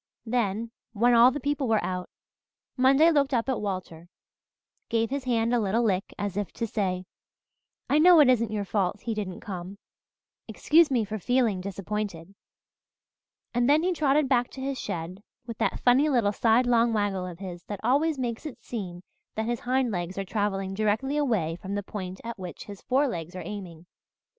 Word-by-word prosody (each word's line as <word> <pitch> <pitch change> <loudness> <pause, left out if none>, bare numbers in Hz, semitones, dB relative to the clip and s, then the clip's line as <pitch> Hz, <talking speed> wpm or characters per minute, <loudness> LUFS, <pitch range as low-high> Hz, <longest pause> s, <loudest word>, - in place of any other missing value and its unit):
Then, 225 -1 -1 0.2
when 240 +3 +3
all 235 +1 +8
the 280 +3 -4
people 285 -1 -1
were 220 -2 +2
out, 180 -1 -3 0.7
Monday 275 +5 +5
looked 280 -3 +2
up 230 +1 0
at 260 -4 -1
Walter, 185 -4 -5 0.8
gave 230 0 0
his 275 -1 -3
hand 235 -1 +1
a 240 - +3
little 220 +3 +1
lick 195 -4 0
as 200 -2 -3
if 205 -4 -2
to 230 - -2
say, 185 -4 -2 0.8
'I 295 - +3
know 350 +1 +7
it 295 - +7
isn't 230 -3 +3
your 210 -2 -2
fault 195 -1 -1
he 230 - -3
didn't 200 -4 -5
come 190 -1 -7 0.7
excuse 320 +1 +4
me 240 -5 +1
for 215 +1 -5
feeling 235 -4 +1
disappointed,' 195 -2 -5 1.2
and 245 +2 +2
then 305 +3 +4
he 365 +1 +1
trotted 295 -3 +2
back 245 -2 +2
to - - -11
his 270 -1 -3
shed, 175 +3 -5 0.2
with 230 -2 -8
that - - 0
funny 260 +5 +4
little 235 -7 +2
sidelong 235 +1 +3
waggle 200 -3 -1
of 175 -2 -8
his 180 -2 -8
that 205 -2 -6
always 285 +6 +2
makes 245 +2 -3
it 285 - -9
seem 185 -6 -6 0.3
that 220 - -1
his 240 0 -1
hind 255 -1 0
legs 180 0 -4
are 195 - -2
travelling 195 -2 -2
directly 220 +7 0
away 215 - 0
from 195 +2 -5
the 205 - -2
point 190 -2 -6
at 230 -2 -6
which 180 -2 -8
his 200 -2 -10
forelegs 220 - -1
are 180 - -5
aiming. 180 -4 -8
220 Hz, 180 wpm, -27 LUFS, 195-255 Hz, 1.2 s, all